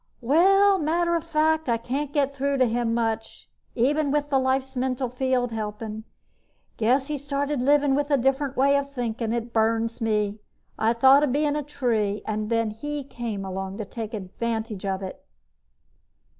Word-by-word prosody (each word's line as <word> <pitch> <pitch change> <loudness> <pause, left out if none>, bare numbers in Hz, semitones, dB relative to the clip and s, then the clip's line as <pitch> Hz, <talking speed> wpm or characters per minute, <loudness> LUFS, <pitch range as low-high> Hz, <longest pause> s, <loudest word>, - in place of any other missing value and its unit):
"Well... 385 +9 +4
matter 340 +2 +1
of 335 - -1
fact, 315 -2 +1
I 230 - +3
can't 270 +5 -3
get 280 -1 0
through 280 +1 0
to 255 - +4
him 235 0 0
much, 225 -1 -3 0.3
even 285 +5 +2
with 295 +1 0
the 270 - +4
Life's 265 0 0
mental 255 0 -1
field 250 -1 0
helping. 215 0 -5 0.7
Guess 250 +5 +2
he 295 0 -4
started 285 0 -2
living 285 +1 +3
with 290 +1 0
a 285 - +4
different 270 +2 0
way 280 +2 +4
of 280 0 -2
thinking. 230 -3 -3
It 235 0 -3
burns 225 +1 +1
me. 210 -2 0 0.4
I 225 +1 +2
thought 265 +4 +6
of 295 -3 +1
being 290 +2 +1
a 300 - 0
tree, 230 -8 -1
and 215 0 -2
then 230 -2 +1
he 290 +6 -5
came 230 -7 -5
along 190 +1 -5
to 215 - -4
take 225 +2 -6
advantage 220 +1 -4
of 190 0 -2
it!" 190 - -8
255 Hz, 170 wpm, -25 LUFS, 225-285 Hz, 0.7 s, thought